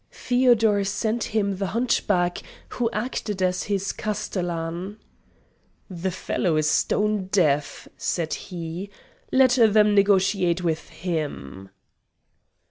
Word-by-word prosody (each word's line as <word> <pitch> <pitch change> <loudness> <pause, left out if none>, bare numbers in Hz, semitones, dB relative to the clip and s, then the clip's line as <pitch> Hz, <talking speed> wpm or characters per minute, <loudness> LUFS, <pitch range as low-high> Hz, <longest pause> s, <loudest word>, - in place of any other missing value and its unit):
Feodor 235 -5 +2
sent 220 +3 -1
him 200 -3 -1
the 195 0 -2
hunchback 195 -7 +1 0.3
who 235 -2 -1
acted 215 -3 -3
as 180 0 +1
his 195 -1 0
castellan. 180 -2 -4 0.9
"The 180 +1 -3
fellow 175 -2 -1
is 155 0 +1
stone 210 +5 +1
deaf," 150 -7 0
said 165 -3 -2
he; 175 +2 -6 0.4
"let 260 -1 +5
them 210 -1 +5
negotiate 190 -3 +2
with 160 -2 -2
him!" 145 - -5
190 Hz, 105 wpm, -24 LUFS, 170-210 Hz, 0.9 s, let